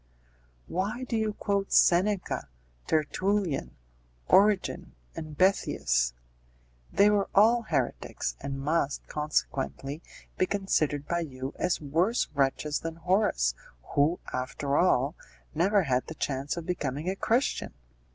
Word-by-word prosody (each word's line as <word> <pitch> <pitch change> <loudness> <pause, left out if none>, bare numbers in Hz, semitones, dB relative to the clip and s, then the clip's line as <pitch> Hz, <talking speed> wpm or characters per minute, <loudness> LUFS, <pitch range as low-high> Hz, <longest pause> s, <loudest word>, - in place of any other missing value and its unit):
"Why 205 +8 -2
do 245 -2 -3
you 220 -1 0
quote 200 -2 -1
Seneca, 180 - +3 0.4
Tertullian, 175 +2 0 0.5
Origen, 200 - +3 0.2
and 155 -2 -7
Boethius? - - +2 0.8
They 205 +1 +5
were 205 -1 +1
all 225 +4 +6
heretics, 125 - -2
and 135 -1 -4
must, 145 0 0
consequently, 145 -1 -2 0.4
be 185 - +3
considered 155 -8 0
by 170 - 0
you 135 -4 -5
as 180 -1 +1
worse 165 - +1
wretches 140 +1 0
than 165 0 -5
Horace, 165 - +1 0.4
who, 150 +5 +3
after 135 +2 -2
all, 145 -4 +3 0.4
never 190 +5 +3
had 130 -4 0
the 160 - -7
chance 140 +2 -2
of 170 - -5
becoming 150 -3 -3
a 190 - 0
Christian!" 235 - 0
165 Hz, 120 wpm, -28 LUFS, 140-195 Hz, 0.8 s, all